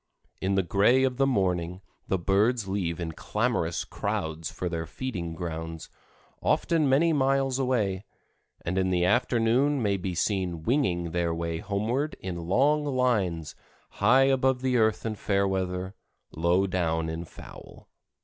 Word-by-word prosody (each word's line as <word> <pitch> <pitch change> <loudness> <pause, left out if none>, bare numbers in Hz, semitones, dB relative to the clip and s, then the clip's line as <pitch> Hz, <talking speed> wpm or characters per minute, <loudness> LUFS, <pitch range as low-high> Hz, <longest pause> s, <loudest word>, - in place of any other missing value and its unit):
In 95 +1 0
the 95 - +2
gray 100 +9 +3
of 130 -2 0
the 135 0 +3
morning 90 -6 0 0.3
the 95 - +1
birds 100 +5 +1
leave 90 -4 -2
in 85 -2 -3
clamorous - - -1
crowds 80 0 -3
for 90 - -4
their 85 -1 -3
feeding 85 -6 -5
grounds, 80 -1 -6 0.5
often 160 -4 +2
many 160 +5 +4
miles 135 -1 +1
away, 105 -8 0 0.6
and 90 +3 0
in 95 0 +1
the 90 -1 +2
afternoon 120 +5 +2
may 100 -4 +1
be 90 -1 -4
seen 90 -3 -1
winging 85 - 0
their 85 -1 0
way 85 0 -3
homeward 110 - -1
in 85 -3 -5
long 145 +10 +3
lines, 110 - 0 0.4
high 120 +7 +4
above 130 -1 +2
the 130 -1 +1
earth 110 -2 +2
in 110 - -1
fair 100 -1 0
weather, 95 0 -2 0.4
low 85 +4 +2
down 80 -3 -1
in 80 +1 -4
foul. 85 - -13
95 Hz, 150 wpm, -27 LUFS, 85-125 Hz, 0.6 s, many